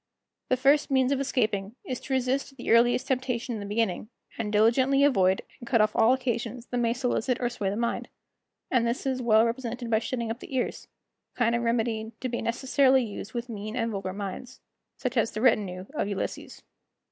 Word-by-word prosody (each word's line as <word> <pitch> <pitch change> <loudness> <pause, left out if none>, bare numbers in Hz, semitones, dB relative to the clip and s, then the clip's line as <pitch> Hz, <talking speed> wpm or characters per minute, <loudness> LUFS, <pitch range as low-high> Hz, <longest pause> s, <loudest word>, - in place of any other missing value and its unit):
The 255 - +3
first 280 +4 +3
means 265 -1 +3
of 275 - +1
escaping 215 -6 -1
is 255 -2 -4
to 270 - -5
resist 265 +2 -1
the - - -3
earliest 240 +2 +4
temptation 250 -2 -1
in 220 - -4
the 200 - -6
beginning, 210 -1 -1 0.3
and 215 -2 -3
diligently 255 +6 +4
avoid 190 -9 +3 0.2
and 240 - -10
cut 230 - +3
off 215 0 +2
all 225 +2 +5
occasions 240 -2 -2
that 245 - -3
may 230 -1 +2
solicit 250 0 0
or 245 - 0
sway 210 -5 -2
the 200 - -2
mind; 235 +2 -2 0.6
and 240 -3 +3
this 235 +3 -2
is 260 -1 -1
well 220 -1 +5
represented 240 0 -3
by 220 - +4
shutting 235 -1 -3
up 230 - -5
the 265 - -8
ears, 250 - -2 0.5
a - - -27
kind 235 -1 +2
of 235 - +1
remedy 230 -1 -1
to 255 - -3
be 240 - -3
necessarily 265 +2 +3
used 215 0 -7
with 235 0 -3
mean 215 -1 -6
and 230 -2 -1
vulgar 195 -2 -3
minds, 200 +6 -6 0.4
such 255 0 -3
as 225 -1 +3
the 215 - -5
retinue 200 -7 +2
of 295 - -1
Ulysses. 200 -2 -5
235 Hz, 205 wpm, -27 LUFS, 220-255 Hz, 0.6 s, all